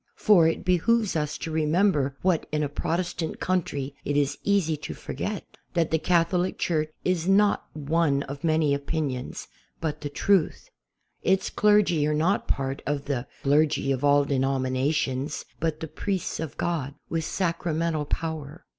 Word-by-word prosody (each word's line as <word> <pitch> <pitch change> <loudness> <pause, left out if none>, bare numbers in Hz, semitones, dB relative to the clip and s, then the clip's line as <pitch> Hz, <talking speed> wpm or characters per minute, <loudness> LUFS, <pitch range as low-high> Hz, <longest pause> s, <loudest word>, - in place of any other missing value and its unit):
For 185 -7 +5
it 165 - -1
behooves 200 +4 +2
us 150 -1 -1
to 165 - -5
remember 155 -3 +2
what 180 -3 +2
in 150 0 0
a 145 - -1
Protestant 170 +2 -2
country 145 -7 -1
it 145 - 0
is 145 0 +1
easy 195 -6 +2
to - - -6
forget: 210 -1 -4 0.3
that 165 -2 +1
the 160 - +2
Catholic 175 +2 +1
Church 155 -3 0 0.2
is 180 -2 +1
not 200 +1 +3
one 150 -1 +1
of 140 +3 -8
many 155 -3 +2
opinions, 140 -3 -3 0.3
but 160 -2 -3
the 145 - -3
truth. 185 +3 +1 0.5
Its 190 +1 +1
clergy 205 -8 +3
are 150 - +1
not 170 +7 +1
part 135 0 -1
of 145 -1 -1
the 135 -3 -2 0.2
''clergy 145 -1 +3
of 130 +1 -4
all 145 0 +5
denominations," 135 0 0
but 155 -1 -1
the 160 - -3
priests 190 +3 -3
of 160 -2 -5
God 145 -5 -2
with 165 -1 -2
Sacramental 165 -3 -1
power. 160 0 -4
155 Hz, 155 wpm, -26 LUFS, 145-175 Hz, 0.5 s, For